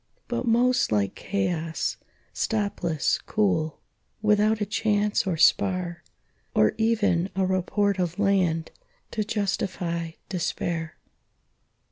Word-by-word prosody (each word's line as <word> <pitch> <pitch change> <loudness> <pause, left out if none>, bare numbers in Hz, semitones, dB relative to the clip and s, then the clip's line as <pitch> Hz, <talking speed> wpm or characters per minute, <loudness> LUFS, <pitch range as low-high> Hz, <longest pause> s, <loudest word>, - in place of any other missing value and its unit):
But 250 - -2
most 245 - +3
like 100 -2 +1
chaos, 175 -5 -2 0.4
stopless, 200 -8 0
cool, 185 -8 0 0.4
Without 210 +1 +3
a 205 - 0
chance 210 -1 +1
or 175 -4 0
spar, 180 -1 +2 0.5
Or 110 - +4
even 205 -6 +2
a 190 0 +2
report 190 +2 +1
of 180 -1 -1
land 185 -5 +1 0.4
To 215 - -1
justify 180 -5 -2
despair. 170 -3 -3
190 Hz, 100 wpm, -26 LUFS, 170-210 Hz, 0.5 s, Or